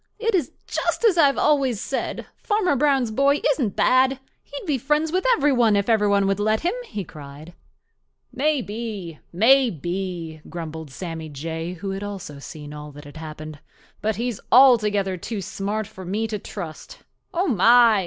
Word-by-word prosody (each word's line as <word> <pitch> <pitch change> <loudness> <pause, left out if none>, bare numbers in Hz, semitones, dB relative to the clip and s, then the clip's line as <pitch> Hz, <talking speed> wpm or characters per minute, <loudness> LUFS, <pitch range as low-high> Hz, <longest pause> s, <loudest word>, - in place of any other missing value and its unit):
It 455 +1 0
is 330 -9 +1
just - - -1
as 420 -6 +5
I 325 -4 +6
have 275 - 0
always 275 -7 +2
said—Farmer 365 - -2
Brown's 270 -4 +2
boy 280 +5 +3
isn't 250 -8 -1
bad. 260 +1 +3 0.2
He'd 285 +7 -9
be 290 -6 0
friends 300 +5 +1
with 370 +2 0
every 290 0 +3
one 235 -4 +4
if 200 +2 0
every 215 -2 +3
one 200 -1 +3
would 195 0 0
let 215 +1 +1
him," 350 +4 0
he 205 - -4
cried. 150 +1 -11 0.8
"Maybe, 225 - -2
maybe," 180 - +1
grumbled 160 -2 -6
Sammy 160 +2 -6
Jay, 165 +4 -5
who 195 +2 -5
also 200 -7 -6
had 140 - -11
seen 150 -1 -9
all 150 0 -8
that 145 +1 -12
had 145 +2 -12
happened. 155 -1 -8 0.4
"But 215 0 0
he's 235 -1 -3
altogether 210 -7 +5
too 215 +4 -5
smart 200 +3 -3
for 195 -3 -11
me 205 +5 -2
to 210 -1 -3
trust. 195 - -8 0.3
Oh, 360 +3 0
my! 230 - +6
210 Hz, 165 wpm, -23 LUFS, 170-265 Hz, 0.8 s, I